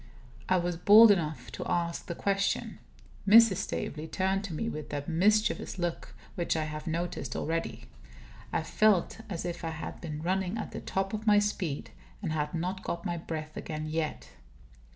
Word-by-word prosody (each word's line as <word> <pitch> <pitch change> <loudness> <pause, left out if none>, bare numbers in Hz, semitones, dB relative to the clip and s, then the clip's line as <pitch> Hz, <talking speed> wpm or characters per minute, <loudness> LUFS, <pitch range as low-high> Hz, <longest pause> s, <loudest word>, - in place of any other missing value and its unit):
I 185 - +4
was 175 -1 -1
bold 210 +5 +9
enough 160 -6 -1
to - - -5
ask 170 -1 -1
the 170 - -4
question. 200 +1 0 0.5
Mrs. 220 -2 +8
Staveley 160 -6 -3
turned 190 +3 0
to 185 - -6
me 225 - -2
with 155 -9 -5
that 145 -1 -4
mischievous 205 +6 +2
look 175 -2 -3 0.2
which 170 -2 -1
I 155 - 0
have 155 +2 -6
noticed 165 -6 -3
already. 120 -8 -2 0.7
I - - 0
felt 215 -2 +2
as 175 -4 -4
if 175 -1 -4
I 165 - -1
had 160 0 -6
been 155 -2 -5
running 190 +3 0
at 220 - -5
the - - -6
top 195 +1 -2
of 215 +1 -4
my 210 -1 +7
speed, 195 -8 -1 0.3
and 180 -6 -3
had 150 +1 -2
not 180 +3 -2
got 170 - -4
my 175 -1 -1
breath 155 -2 -6
again, 155 -1 -5
yet. 155 0 -3
175 Hz, 175 wpm, -30 LUFS, 155-195 Hz, 0.7 s, bold